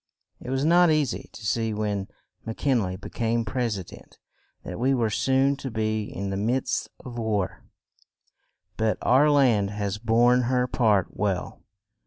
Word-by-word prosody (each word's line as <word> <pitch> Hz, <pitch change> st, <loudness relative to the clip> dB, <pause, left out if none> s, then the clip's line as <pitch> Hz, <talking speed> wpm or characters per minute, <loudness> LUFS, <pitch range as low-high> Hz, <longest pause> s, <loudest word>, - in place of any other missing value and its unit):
It -, -, -8 dB
was 135 Hz, +2 st, 0 dB
not 175 Hz, +1 st, +5 dB
eas 150 Hz, -6 st, +2 dB
y -, -, -7 dB
to 115 Hz, -, -11 dB
see 110 Hz, +1 st, 0 dB
when 105 Hz, -2 st, -2 dB, 0.4 s
Mc 115 Hz, -, -6 dB
Kin 130 Hz, -5 st, +2 dB
ley 95 Hz, -2 st, -3 dB
be 95 Hz, -, -9 dB
came 115 Hz, 0 st, 0 dB
pres 115 Hz, -1 st, -1 dB
i 95 Hz, -, -5 dB
dent -, -, -15 dB, 0.5 s
that -, -, -7 dB
we 135 Hz, +3 st, +2 dB
were 115 Hz, -3 st, 0 dB
soon 135 Hz, +4 st, +2 dB
to 135 Hz, -, -5 dB
be 110 Hz, -1 st, -1 dB
in 100 Hz, -1 st, -5 dB
the 95 Hz, -, -2 dB
midst 120 Hz, +6 st, -1 dB, 0.2 s
of 120 Hz, -2 st, -6 dB
war; 105 Hz, -5 st, -2 dB, 1.1 s
but 110 Hz, -1 st, +1 dB
our 140 Hz, +4 st, +5 dB
land 125 Hz, -9 st, +3 dB
has 105 Hz, 0 st, -3 dB
borne 120 Hz, +3 st, +4 dB
her 125 Hz, -1 st, +2 dB
part 110 Hz, -7 st, +1 dB
well. 95 Hz, -3 st, -2 dB
115 Hz, 175 wpm, -25 LUFS, 105-130 Hz, 1.1 s, not